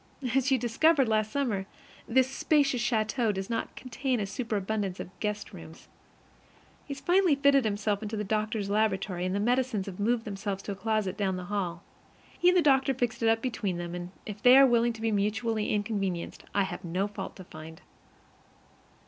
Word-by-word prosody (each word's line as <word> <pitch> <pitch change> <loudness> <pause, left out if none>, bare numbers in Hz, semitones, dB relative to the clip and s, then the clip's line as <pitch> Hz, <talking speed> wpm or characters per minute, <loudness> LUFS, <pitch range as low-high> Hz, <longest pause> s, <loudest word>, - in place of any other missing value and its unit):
As 270 0 +2
you 265 - +5
discovered 265 +4 +3
last 215 -1 +1
summer, 220 -9 -1 0.4
this 260 +2 +3
spacious 275 -1 +1
château 225 0 +1
does 190 +2 -4
not 230 - -3
contain 255 0 -2
a 205 - -1
superabundance 205 -3 -2
of - - -7
guest 210 -1 -3
rooms. 165 -2 -12 1.0
He 280 - -4
has - - -10
finally 355 -1 +3
fitted 280 -2 +4
himself 205 -1 -1
into 215 0 -4
the 210 - -1
doctor's 215 0 -1
laboratory, 195 -4 0
and 185 - -2
the - - 0
medicines 240 -2 +1
have 190 -1 -8
moved 225 +3 +1
themselves 200 -1 -4
to - - -4
a - - -4
closet 205 -2 -1
down 195 -3 0
the 180 - -5
hall. 175 -4 -2 0.5
He 350 - +1
and 365 - +4
the 350 - +4
doctor 270 -2 +3
fixed 245 -2 -2
it 225 - +3
up 225 0 +2
between 210 -8 -2
them, 175 0 -5
and 175 0 -5 0.2
if 210 -1 -7
they 250 +1 +8
are 275 - +9
willing 235 -2 +3
to 225 - -11
be 225 0 0
mutually 215 +2 0
inconvenienced, 200 -4 -2
I 200 - +2
have 185 0 -5
no 180 +4 -1
fault 205 - -7
to 190 - -10
find. 160 -1 -11
215 Hz, 190 wpm, -29 LUFS, 195-245 Hz, 1.0 s, are